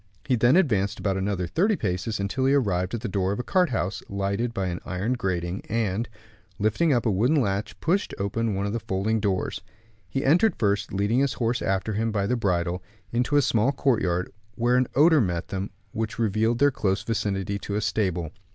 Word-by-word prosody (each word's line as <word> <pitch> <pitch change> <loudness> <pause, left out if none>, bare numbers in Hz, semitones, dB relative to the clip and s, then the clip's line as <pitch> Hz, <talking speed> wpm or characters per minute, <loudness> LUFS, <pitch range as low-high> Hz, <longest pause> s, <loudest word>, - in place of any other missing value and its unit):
He 130 - +2
then 120 +5 +4
advanced 110 - +2
about 100 -4 -1
another 95 -1 -1
thirty 200 - +1
paces, 100 - -2
until 100 +7 -1
he 140 - +4
arrived 95 -6 0
at 115 - -5
the 115 - -3
door 95 -1 0
of 100 - -3
a - - -1
cart 180 +2 +2
house, 95 -5 -2
lighted 100 +4 -1
by 95 -4 -2
an 90 -1 -3
iron 95 +7 -2
grating; 95 -6 -2
and, 110 0 -1 0.5
lifting 110 +11 +2
up 120 -3 +2
a 110 - +3
wooden 120 +11 +3
latch, 100 -4 -2
pushed 190 +5 +1
open 105 +2 -1
one 100 +1 -1
of 100 - -2
the 115 - -1
folding 100 +2 -1
doors. 100 -3 -1 0.5
He 135 +9 -2
entered 175 +10 +4
first, 100 -2 0
leading 100 +5 +1
his 140 0 +2
horse 120 0 -1
after 95 +3 -1
him 115 +2 0
by 100 -2 0
the 125 - +1
bridle, 90 -5 0 0.3
into 125 +5 0
a 145 - +4
small 115 +3 +2
courtyard, 100 -10 0 0.2
where 120 +1 +2
an 125 0 +3
odor 155 +2 +6
met 85 -5 -2
them 95 0 -3 0.2
which 110 0 -3
revealed 110 +1 +1
their 145 +3 +4
close 95 -6 -1
vicinity 100 -3 -2
to 100 - -4
a - - +1
stable. 95 -6 -1
105 Hz, 205 wpm, -25 LUFS, 95-120 Hz, 0.5 s, odor